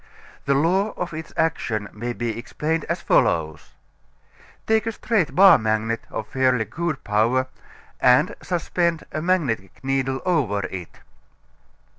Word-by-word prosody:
The 140 Hz, -, +2 dB
law 185 Hz, +8 st, +2 dB
of 175 Hz, -1 st, -4 dB
its 160 Hz, 0 st, -7 dB
action 110 Hz, -10 st, -1 dB
may 120 Hz, +3 st, -4 dB
be 120 Hz, -2 st, -3 dB
explained 150 Hz, +6 st, -3 dB
as -, -, -3 dB
follows: 80 Hz, -2 st, +1 dB, 0.9 s
Take 220 Hz, 0 st, +2 dB
a -, -, +1 dB
straight 210 Hz, -8 st, 0 dB
bar 195 Hz, +1 st, +8 dB
magnet 110 Hz, +1 st, -1 dB
of 110 Hz, -, -5 dB
fairly 130 Hz, -3 st, +1 dB
good 160 Hz, +6 st, -4 dB
power 115 Hz, +5 st, +2 dB, 0.5 s
and 130 Hz, +6 st, +4 dB
suspend 170 Hz, -2 st, -1 dB
a 155 Hz, -, -3 dB
magnetic 135 Hz, -, -1 dB
needle 135 Hz, 0 st, 0 dB
over 120 Hz, -, +1 dB
it. 95 Hz, -2 st, -8 dB
135 Hz, 130 wpm, -23 LUFS, 110-170 Hz, 0.9 s, bar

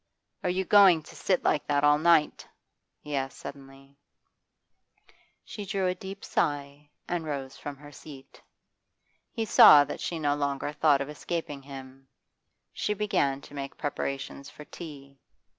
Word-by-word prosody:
'Are 180 Hz, -, 0 dB
you 185 Hz, +1 st, -1 dB
going 190 Hz, -5 st, +6 dB
to, -, -, -14 dB
sit 185 Hz, -2 st, 0 dB
like 150 Hz, -, +1 dB
that 145 Hz, 0 st, +1 dB
all 145 Hz, 0 st, +5 dB
night?' 160 Hz, -2 st, +2 dB, 0.5 s
he 150 Hz, -1 st, -5 dB
asked 135 Hz, -1 st, -3 dB
suddenly. 135 Hz, 0 st, -12 dB, 1.5 s
She 210 Hz, -, -7 dB
drew 195 Hz, -1 st, -2 dB
a 180 Hz, -, +1 dB
deep 190 Hz, +2 st, -9 dB
sigh 145 Hz, 0 st, -2 dB, 0.2 s
and 175 Hz, -2 st, -2 dB
rose 140 Hz, -3 st, -5 dB
from 145 Hz, -1 st, -7 dB
her 145 Hz, +1 st, -13 dB
seat. 140 Hz, -2 st, -13 dB, 0.9 s
He 225 Hz, -2 st, -3 dB
saw 145 Hz, -7 st, +8 dB
that -, -, -7 dB
she 170 Hz, -, -3 dB
no 145 Hz, -2 st, +1 dB
longer 140 Hz, 0 st, -2 dB
thought 145 Hz, -2 st, +3 dB
of 140 Hz, -, -4 dB
escaping 150 Hz, -1 st, -5 dB
him. 135 Hz, -1 st, -11 dB, 0.7 s
She 210 Hz, -, -2 dB
began 140 Hz, -10 st, 0 dB
to -, -, -15 dB
make 140 Hz, -1 st, -6 dB
preparations 140 Hz, -1 st, -4 dB
for 150 Hz, -, -12 dB
tea. 140 Hz, -5 st, -11 dB
145 Hz, 150 wpm, -28 LUFS, 140-170 Hz, 1.5 s, saw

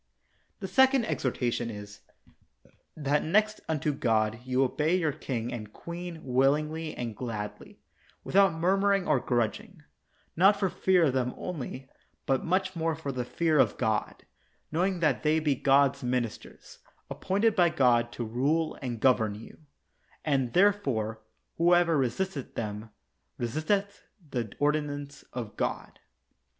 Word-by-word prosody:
The 190 Hz, -, -3 dB
second 265 Hz, +5 st, +4 dB
exhortation 120 Hz, -, -1 dB
is: 105 Hz, -1 st, -9 dB, 1.0 s
That 145 Hz, 0 st, +1 dB
next 215 Hz, +6 st, +1 dB
unto 150 Hz, -1 st, 0 dB
God 110 Hz, -4 st, +1 dB
you 130 Hz, +1 st, +1 dB
obey 150 Hz, +6 st, +1 dB
your 165 Hz, -5 st, +1 dB
king 120 Hz, -4 st, -4 dB
and 105 Hz, -3 st, -7 dB
queen 170 Hz, +1 st, -8 dB
willingly 150 Hz, +5 st, +1 dB
and 115 Hz, -3 st, -4 dB
gladly, 105 Hz, -4 st, -6 dB, 0.4 s
without 195 Hz, -1 st, +4 dB
murmuring 195 Hz, +3 st, +2 dB
or 135 Hz, -, +3 dB
grudging; 120 Hz, -, -2 dB, 0.5 s
not 195 Hz, +4 st, +5 dB
for 190 Hz, -3 st, 0 dB
fear 185 Hz, -2 st, +3 dB
of 140 Hz, -5 st, +2 dB
them 125 Hz, -1 st, -1 dB
only, 135 Hz, -6 st, -6 dB, 0.4 s
but 135 Hz, -1 st, +1 dB
much 185 Hz, +2 st, 0 dB
more 165 Hz, -1 st, 0 dB
for 145 Hz, -2 st, -5 dB
the 125 Hz, -2 st, -3 dB
fear 155 Hz, +4 st, +1 dB
of -, -, +3 dB
God, 110 Hz, -3 st, -2 dB, 0.5 s
knowing 180 Hz, +2 st, 0 dB
that 150 Hz, -6 st, +2 dB
they 155 Hz, +1 st, +2 dB
be 155 Hz, -2 st, +1 dB
God's 140 Hz, +1 st, +3 dB
ministers, 125 Hz, -3 st, -4 dB, 0.3 s
ap -, -, -7 dB
pointed 205 Hz, +3 st, +2 dB
by 175 Hz, -4 st, +4 dB
God 120 Hz, -6 st, +2 dB
to 120 Hz, -, -4 dB
rule 145 Hz, +8 st, 0 dB
and 120 Hz, -4 st, -4 dB
govern 110 Hz, -5 st, +3 dB
you; 110 Hz, -, -12 dB, 0.7 s
and, 135 Hz, -5 st, 0 dB
therefore, 135 Hz, -, +2 dB, 0.4 s
whosoever 175 Hz, -1 st, +4 dB
resisteth 140 Hz, +3 st, -2 dB
them, 105 Hz, 0 st, -4 dB, 0.5 s
resisteth 160 Hz, -, -1 dB, 0.3 s
the 115 Hz, -5 st, -3 dB
ordinance 145 Hz, -1 st, -1 dB
of 115 Hz, -4 st, -6 dB
God. -, -, -3 dB
145 Hz, 135 wpm, -28 LUFS, 120-170 Hz, 1.0 s, not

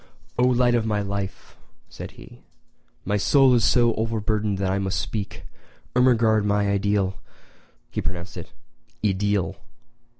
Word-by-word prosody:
"O 125 Hz, -, +5 dB
light 125 Hz, -1 st, +3 dB
of 120 Hz, -2 st, +2 dB
my 105 Hz, -2 st, 0 dB
life," 100 Hz, -1 st, -5 dB, 0.3 s
said -, -, -9 dB
he, -, -, -14 dB, 0.6 s
"my 105 Hz, +2 st, +1 dB
soul 135 Hz, +5 st, +5 dB
is 120 Hz, -2 st, +3 dB
so 120 Hz, 0 st, +4 dB
overburdened 110 Hz, -2 st, -1 dB
that 95 Hz, -1 st, 0 dB
I 100 Hz, -, 0 dB
must 95 Hz, -1 st, -1 dB
speak! 105 Hz, -3 st, -5 dB, 0.5 s
Ermengarde, 115 Hz, -4 st, +4 dB
my 105 Hz, 0 st, +1 dB
ideal 100 Hz, -1 st, 0 dB, 0.7 s
[he -, -, -2 dB
pronounced 90 Hz, 0 st, -5 dB
it 85 Hz, -, -8 dB, 0.5 s
i 105 Hz, -, +4 dB
deel! 100 Hz, -1 st, -1 dB
105 Hz, 140 wpm, -24 LUFS, 100-115 Hz, 0.7 s, O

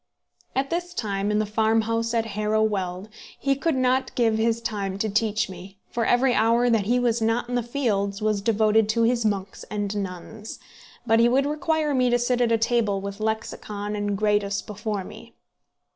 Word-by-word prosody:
At 270 Hz, +1 st, -1 dB
this 350 Hz, +1 st, -3 dB
time, 200 Hz, -, -1 dB
in 210 Hz, -, +1 dB
the 215 Hz, -, +1 dB
farmhouse 225 Hz, +2 st, +1 dB
at 225 Hz, -1 st, +1 dB
Harrow 215 Hz, +1 st, +1 dB
Weald, 190 Hz, -2 st, -2 dB, 0.3 s
he 275 Hz, 0 st, +1 dB
could 310 Hz, +2 st, 0 dB
not 255 Hz, 0 st, +1 dB
give 225 Hz, -3 st, +2 dB
his 230 Hz, 0 st, +1 dB
time 200 Hz, -4 st, -3 dB
to 215 Hz, +2 st, -1 dB
teach 215 Hz, 0 st, +1 dB
me, 190 Hz, +1 st, -11 dB
for 235 Hz, -1 st, -1 dB
every 250 Hz, +1 st, +3 dB
hour 235 Hz, +2 st, +3 dB
that 220 Hz, -4 st, +2 dB
he 245 Hz, +2 st, +3 dB
was 240 Hz, -2 st, +1 dB
not 225 Hz, +2 st, +1 dB
in 245 Hz, -, -5 dB
the 245 Hz, -, +1 dB
fields 215 Hz, -6 st, -1 dB
was 215 Hz, -2 st, 0 dB
devoted 215 Hz, 0 st, +3 dB
to 230 Hz, +1 st, +2 dB
his 235 Hz, 0 st, +2 dB
monks 195 Hz, -2 st, -3 dB
and 205 Hz, 0 st, -3 dB
nuns; 200 Hz, +2 st, -6 dB, 0.5 s
but 225 Hz, -1 st, +4 dB
he 235 Hz, +1 st, +5 dB
would 270 Hz, +3 st, +2 dB
require 305 Hz, 0 st, 0 dB
me 255 Hz, -2 st, +3 dB
to 245 Hz, -, +3 dB
sit 245 Hz, 0 st, 0 dB
at 235 Hz, -1 st, +2 dB
a 230 Hz, -, +4 dB
table 225 Hz, -3 st, +1 dB
with 200 Hz, +1 st, -6 dB
Lexicon 210 Hz, -1 st, -3 dB
and 205 Hz, -1 st, -1 dB
Gradus 205 Hz, -1 st, +1 dB
before 210 Hz, -1 st, -4 dB
me. -, -, -12 dB
220 Hz, 190 wpm, -24 LUFS, 205-240 Hz, 0.5 s, he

